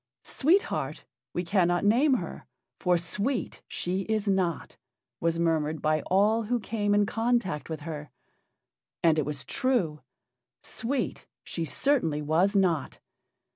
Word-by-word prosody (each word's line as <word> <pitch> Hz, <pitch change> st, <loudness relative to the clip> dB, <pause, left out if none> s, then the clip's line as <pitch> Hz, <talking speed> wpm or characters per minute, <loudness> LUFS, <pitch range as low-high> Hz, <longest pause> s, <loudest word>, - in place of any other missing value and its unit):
"Sweet 350 Hz, +9 st, +3 dB
Heart -, -, -4 dB, 0.3 s
we 175 Hz, -, -2 dB
cannot 175 Hz, 0 st, +2 dB
name 260 Hz, +7 st, +4 dB
her, -, -, -5 dB, 0.3 s
for 180 Hz, -1 st, +3 dB
sweet 210 Hz, +9 st, -2 dB
she 185 Hz, +2 st, -2 dB
is 215 Hz, -1 st, 0 dB
not," 185 Hz, -5 st, 0 dB, 0.4 s
was 165 Hz, 0 st, +1 dB
murmured 160 Hz, -2 st, +1 dB
by 155 Hz, 0 st, +1 dB
all 210 Hz, +4 st, +3 dB
who 245 Hz, +2 st, 0 dB
came 205 Hz, -1 st, 0 dB
in 205 Hz, 0 st, +4 dB
contact 225 Hz, -9 st, 0 dB
with 160 Hz, -2 st, -4 dB
her. 150 Hz, -1 st, -6 dB, 0.9 s
And 160 Hz, -2 st, +4 dB
it 145 Hz, -, -1 dB
was 145 Hz, -2 st, -5 dB
true. 235 Hz, -, 0 dB, 0.6 s
Sweet 245 Hz, +2 st, -3 dB, 0.2 s
she 165 Hz, -, -3 dB
certainly 160 Hz, -, +1 dB
was 175 Hz, +7 st, +2 dB
not. 180 Hz, -6 st, +1 dB
185 Hz, 135 wpm, -28 LUFS, 160-225 Hz, 0.9 s, name